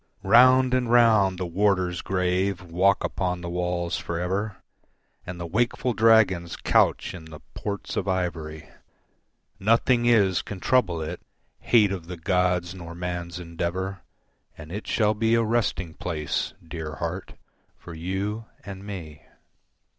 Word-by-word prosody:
Round 130 Hz, +5 st, +6 dB
and 125 Hz, -2 st, +1 dB
round 110 Hz, -6 st, +5 dB
the 90 Hz, -, -3 dB
warders 90 Hz, -1 st, +1 dB
grave 95 Hz, 0 st, 0 dB
walk 90 Hz, +3 st, +2 dB
upon 90 Hz, -2 st, -2 dB
the 85 Hz, 0 st, -5 dB
walls 90 Hz, -1 st, -1 dB
for 85 Hz, -1 st, -4 dB
ever 95 Hz, +4 st, -2 dB, 0.7 s
And 90 Hz, -1 st, -6 dB
the 85 Hz, -, -4 dB
wakeful 120 Hz, +6 st, 0 dB
dragons 105 Hz, -7 st, +4 dB
couch -, -, +2 dB
in 85 Hz, -3 st, -9 dB
the 80 Hz, -1 st, -11 dB
ports 100 Hz, -1 st, -5 dB
of 100 Hz, -, -2 dB
ivory, 85 Hz, -5 st, -3 dB, 0.9 s
Nothing 120 Hz, +3 st, +3 dB
is 100 Hz, -6 st, +4 dB
can 95 Hz, -, -8 dB
trouble 90 Hz, -9 st, +1 dB
it, 85 Hz, +3 st, -6 dB, 0.4 s
hate 105 Hz, -5 st, +4 dB
of 90 Hz, -4 st, -5 dB
the 90 Hz, -1 st, -6 dB
gods 90 Hz, 0 st, 0 dB
nor 85 Hz, -2 st, -9 dB
man's 90 Hz, 0 st, -4 dB
endeavour, 90 Hz, +3 st, -4 dB, 0.6 s
And 80 Hz, 0 st, -10 dB
it 105 Hz, +3 st, -6 dB
shall 105 Hz, -2 st, +2 dB
be 115 Hz, +2 st, +2 dB
a 115 Hz, -, +3 dB
resting 110 Hz, -7 st, -1 dB
place, 80 Hz, -3 st, -3 dB
dear 80 Hz, -2 st, -6 dB
heart, 90 Hz, +2 st, -5 dB, 0.4 s
for 85 Hz, -, -11 dB
you 95 Hz, +6 st, -3 dB, 0.2 s
and 100 Hz, -1 st, -8 dB
me. 85 Hz, -7 st, -8 dB
95 Hz, 140 wpm, -25 LUFS, 85-105 Hz, 0.9 s, Round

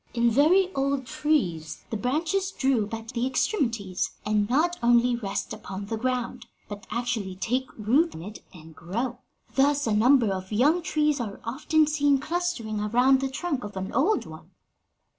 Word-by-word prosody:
In 235 Hz, 0 st, +3 dB
very 360 Hz, -, +4 dB
old 275 Hz, -1 st, 0 dB
trees 245 Hz, -, -1 dB
the -, -, -1 dB
branches 320 Hz, -, 0 dB
droop 260 Hz, -, 0 dB
at 225 Hz, 0 st, -6 dB
the 245 Hz, +1 st, -1 dB
extremities, 230 Hz, -, -1 dB, 0.2 s
and 210 Hz, 0 st, +1 dB
not 325 Hz, +7 st, +2 dB
only 240 Hz, +1 st, +4 dB
rest 205 Hz, -5 st, -4 dB
upon 195 Hz, +1 st, -7 dB
the 225 Hz, -, -3 dB
ground, 250 Hz, +1 st, -3 dB, 0.2 s
but 205 Hz, +2 st, -9 dB
actually 230 Hz, -5 st, -2 dB
take 250 Hz, +7 st, -1 dB
root 260 Hz, +11 st, +2 dB
in 160 Hz, -, -8 dB
it 210 Hz, +3 st, -9 dB
and 160 Hz, -2 st, -14 dB
grow. 230 Hz, +9 st, -4 dB, 0.3 s
Thus 280 Hz, +3 st, +2 dB
a 220 Hz, -, +1 dB
number 235 Hz, 0 st, +4 dB
of 190 Hz, +1 st, -6 dB
young 290 Hz, +11 st, +3 dB
trees 300 Hz, -3 st, +1 dB
are 210 Hz, -5 st, -5 dB
often 305 Hz, +6 st, +2 dB
seen 290 Hz, -2 st, +2 dB
clustering 300 Hz, -8 st, -2 dB
around 245 Hz, +6 st, +3 dB
the 270 Hz, -, -1 dB
trunk 280 Hz, -1 st, -3 dB
of 205 Hz, -1 st, -7 dB
an 190 Hz, 0 st, -4 dB
old 360 Hz, +11 st, +2 dB
one.'" -, -, -12 dB
245 Hz, 165 wpm, -26 LUFS, 210-290 Hz, 0.3 s, very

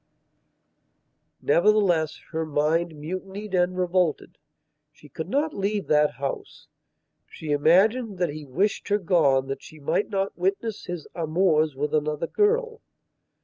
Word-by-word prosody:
Nevertheless 175 Hz, -3 st, +3 dB
her 160 Hz, -1 st, -1 dB
mind 160 Hz, +2 st, 0 dB
mutinied 190 Hz, +6 st, -6 dB
and 180 Hz, 0 st, +1 dB
revolted. 180 Hz, -3 st, 0 dB, 0.5 s
She 150 Hz, 0 st, -17 dB
could 160 Hz, +6 st, -6 dB
not 295 Hz, +6 st, 0 dB
leave 200 Hz, +1 st, -1 dB
that 150 Hz, -1 st, +4 dB
house. 140 Hz, 0 st, -6 dB, 0.6 s
She 155 Hz, -2 st, -7 dB
imagined 195 Hz, -, +3 dB
that 175 Hz, -2 st, 0 dB
he 150 Hz, +1 st, -7 dB
wished 180 Hz, +10 st, -1 dB
her 205 Hz, -, +2 dB
gone 160 Hz, -9 st, +2 dB
that 135 Hz, 0 st, -5 dB
she 155 Hz, -, -13 dB
might 150 Hz, +8 st, 0 dB
not 195 Hz, -1 st, -2 dB
witness 195 Hz, +4 st, -2 dB
his 175 Hz, -3 st, -6 dB
amours 160 Hz, -2 st, +1 dB
with 145 Hz, +2 st, -2 dB
another 150 Hz, +1 st, 0 dB
girl. 455 Hz, -, +1 dB
175 Hz, 130 wpm, -25 LUFS, 150-200 Hz, 0.6 s, that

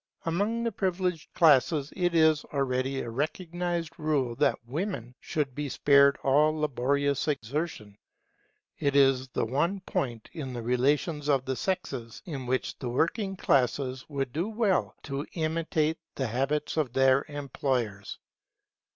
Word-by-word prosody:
Among 205 Hz, +8 st, 0 dB
the 230 Hz, -, 0 dB
privileged 185 Hz, -4 st, -2 dB
classes 150 Hz, -2 st, +4 dB
it 175 Hz, -2 st, 0 dB
is 160 Hz, -2 st, +4 dB
already 135 Hz, -1 st, -1 dB
a 120 Hz, -, -5 dB
recognized 170 Hz, +4 st, -3 dB
rule 145 Hz, -6 st, 0 dB
that -, -, +1 dB
women 135 Hz, -, -4 dB
should 145 Hz, -4 st, -2 dB
be 145 Hz, +1 st, -3 dB
spared 140 Hz, 0 st, +5 dB
all 150 Hz, +3 st, +3 dB
laborious 140 Hz, 0 st, 0 dB
exertion. 140 Hz, -5 st, -3 dB, 0.8 s
It 140 Hz, 0 st, 0 dB
is 135 Hz, -2 st, +4 dB
the 125 Hz, -, -1 dB
one 160 Hz, -, 0 dB
point 120 Hz, -, -3 dB
in 135 Hz, -6 st, -5 dB
the 120 Hz, -1 st, -5 dB
relations 145 Hz, +5 st, +1 dB
of 135 Hz, -2 st, +2 dB
the 130 Hz, -, -1 dB
sexes 125 Hz, -10 st, -3 dB
in 135 Hz, -7 st, -5 dB
which 130 Hz, +1 st, -1 dB
the 125 Hz, -, -3 dB
working 195 Hz, -, 0 dB
classes 130 Hz, -4 st, +1 dB
would 135 Hz, -4 st, -3 dB
do 170 Hz, +7 st, -1 dB
well 215 Hz, -4 st, +1 dB
to 140 Hz, 0 st, -4 dB
imitate 160 Hz, -1 st, 0 dB, 0.2 s
the 130 Hz, -, -1 dB
habits 135 Hz, +7 st, -1 dB
of 140 Hz, -6 st, 0 dB
their 135 Hz, +1 st, +4 dB
employers. 130 Hz, -8 st, -3 dB
145 Hz, 140 wpm, -28 LUFS, 130-165 Hz, 0.8 s, spared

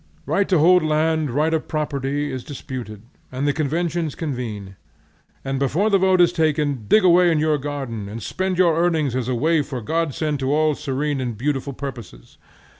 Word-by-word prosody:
Right 200 Hz, -, 0 dB
to 185 Hz, -, +4 dB
hold 180 Hz, +4 st, +5 dB
land, 155 Hz, 0 st, +1 dB
right 150 Hz, +6 st, +1 dB
of 160 Hz, -, -1 dB
property, 145 Hz, -1 st, -2 dB
is 130 Hz, -1 st, -5 dB
disputed, 125 Hz, -7 st, -7 dB, 0.3 s
and 130 Hz, +3 st, -2 dB
the 145 Hz, -, +2 dB
conventions 160 Hz, +1 st, -1 dB
convene, 115 Hz, -, -5 dB, 0.7 s
and 135 Hz, 0 st, -2 dB
before 165 Hz, -, +1 dB
the 195 Hz, -, +4 dB
vote 190 Hz, -1 st, +3 dB
is 175 Hz, -, +4 dB
taken, 150 Hz, -7 st, 0 dB
dig 215 Hz, -, +5 dB
away 180 Hz, 0 st, +5 dB
in 160 Hz, -, +2 dB
your 155 Hz, -1 st, +1 dB
garden, 135 Hz, -8 st, -5 dB
and 110 Hz, +3 st, -6 dB
spend 190 Hz, -, -2 dB
your 175 Hz, -3 st, +4 dB
earnings 160 Hz, -6 st, +1 dB
as 130 Hz, -2 st, -2 dB
a 130 Hz, -, 0 dB
waif 155 Hz, +3 st, +1 dB
or 125 Hz, -2 st, -3 dB
godsend 155 Hz, +2 st, -1 dB
to 135 Hz, 0 st, -1 dB
all 155 Hz, +1 st, +2 dB
serene 145 Hz, -1 st, -2 dB
and 120 Hz, -4 st, -4 dB
beautiful 140 Hz, +2 st, -2 dB
purposes. 120 Hz, -, -9 dB
145 Hz, 185 wpm, -22 LUFS, 130-160 Hz, 0.7 s, hold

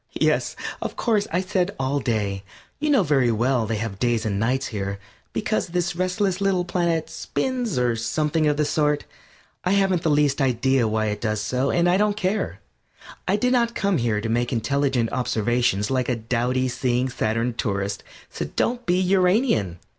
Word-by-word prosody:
Yes, -, -, +1 dB, 0.3 s
of -, -, -4 dB
course, 215 Hz, -4 st, +1 dB
I 175 Hz, +3 st, +1 dB
said 190 Hz, 0 st, -1 dB
"all 135 Hz, +2 st, 0 dB
day." 105 Hz, -6 st, -1 dB, 0.4 s
You 305 Hz, +1 st, 0 dB
know 270 Hz, -8 st, +4 dB
very 135 Hz, -6 st, +2 dB
well 120 Hz, +1 st, +1 dB
they 115 Hz, -, -1 dB
have 105 Hz, -2 st, -4 dB
days 120 Hz, -1 st, +1 dB
and 100 Hz, -2 st, -1 dB
nights 130 Hz, +5 st, 0 dB
here, 100 Hz, -1 st, -3 dB, 0.3 s
because -, -, -1 dB
this 175 Hz, +1 st, -1 dB
restless 185 Hz, +1 st, 0 dB
little 190 Hz, -3 st, +1 dB
planet 170 Hz, -2 st, 0 dB
spins, 245 Hz, -, -2 dB
or 120 Hz, -2 st, +2 dB
something 150 Hz, +7 st, 0 dB
of 150 Hz, -1 st, +1 dB
the 150 Hz, -, +2 dB
sort. 150 Hz, 0 st, +1 dB, 0.6 s
I 180 Hz, -, +1 dB
haven't 195 Hz, -3 st, +2 dB
the 165 Hz, -, +1 dB
least 145 Hz, -1 st, +2 dB
idea 130 Hz, -1 st, +2 dB
why 110 Hz, 0 st, 0 dB
it 105 Hz, -, -4 dB
does 110 Hz, -2 st, -1 dB
so, 125 Hz, +6 st, 0 dB
and 170 Hz, 0 st, +2 dB
I 180 Hz, +1 st, +4 dB
don't 210 Hz, 0 st, +1 dB
care. 200 Hz, +1 st, -1 dB, 0.7 s
I 190 Hz, -, +3 dB
did 250 Hz, +4 st, +1 dB
not 235 Hz, -2 st, +2 dB
come 195 Hz, -6 st, +1 dB
here 115 Hz, -3 st, 0 dB
to 115 Hz, -, -3 dB
make 120 Hz, +2 st, 0 dB
intelligent 130 Hz, 0 st, 0 dB
observations 120 Hz, -3 st, 0 dB
like 130 Hz, -1 st, 0 dB
a 125 Hz, -, +1 dB
dowdy 125 Hz, +3 st, 0 dB
"Seeing 125 Hz, 0 st, 0 dB
Saturn" 115 Hz, 0 st, -1 dB
tourist. 100 Hz, -4 st, -2 dB, 0.3 s
So -, -, -4 dB
don't 245 Hz, +1 st, -1 dB
be 180 Hz, +1 st, +3 dB
Uranian. 185 Hz, -, +2 dB
135 Hz, 180 wpm, -23 LUFS, 115-180 Hz, 0.7 s, know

